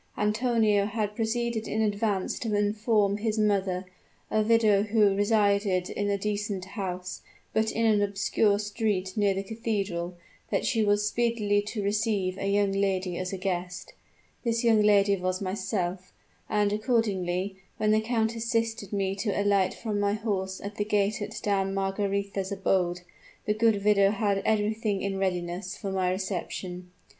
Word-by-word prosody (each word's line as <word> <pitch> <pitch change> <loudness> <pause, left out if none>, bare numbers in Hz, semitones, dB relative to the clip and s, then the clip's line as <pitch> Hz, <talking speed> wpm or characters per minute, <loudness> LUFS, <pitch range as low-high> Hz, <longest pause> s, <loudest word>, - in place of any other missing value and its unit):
Antonio 215 -1 +2
had 210 -1 -2
proceeded 230 0 -1
in 220 - -2
advance 205 -2 0
to 220 -3 -1
inform 210 0 +2
his 220 +1 -1
mother 195 -3 +1 0.5
a 215 - +3
widow 215 -2 +4
who 210 -1 +3
resided 200 -3 +2
in 205 0 -1
a 200 - +1
decent 205 -2 -2
house, 185 -2 -5 0.3
but 220 0 +1
in 230 - 0
an 215 -2 +4
obscure 200 +1 +2
street 205 -3 -2
near 205 -2 +2
the 195 - -2
cathedral 200 -5 -3 0.3
that - - 0
she 225 -2 +2
was 205 0 +2
speedily 215 -3 +1
to 210 0 -4
receive 205 -2 0
a 195 - -1
young 200 0 +2
lady 190 -2 0
as 185 +1 -3
a 195 - -3
guest. 180 -1 -4 0.5
This 230 0 0
young 225 -2 +5
lady 200 -1 +4
was 185 0 -1
myself; 185 -2 -3 0.4
and 205 -1 +2
accordingly, 200 -4 0 0.2
when 215 0 +2
the 215 0 +4
count 225 0 0
assisted 230 -2 -1
me 195 -2 0
to 205 0 -1
alight 200 -2 +2
from 215 -3 -3
my 205 0 +1
horse 195 -3 -2
at 205 +1 -7
the 205 - +1
gate 210 +1 0
of 205 +1 -5
Dame 195 -1 0
Margaretha's 195 0 -1
abode, 185 -2 0 0.4
the 210 - +2
good 215 -2 +2
widow 200 -2 +5
had 200 -1 +1
everything 215 -1 0
in 195 -1 -2
readiness 180 0 -2
for 200 -3 -4
my 185 -1 +1
reception. 180 -1 -4
205 Hz, 155 wpm, -27 LUFS, 195-215 Hz, 0.5 s, young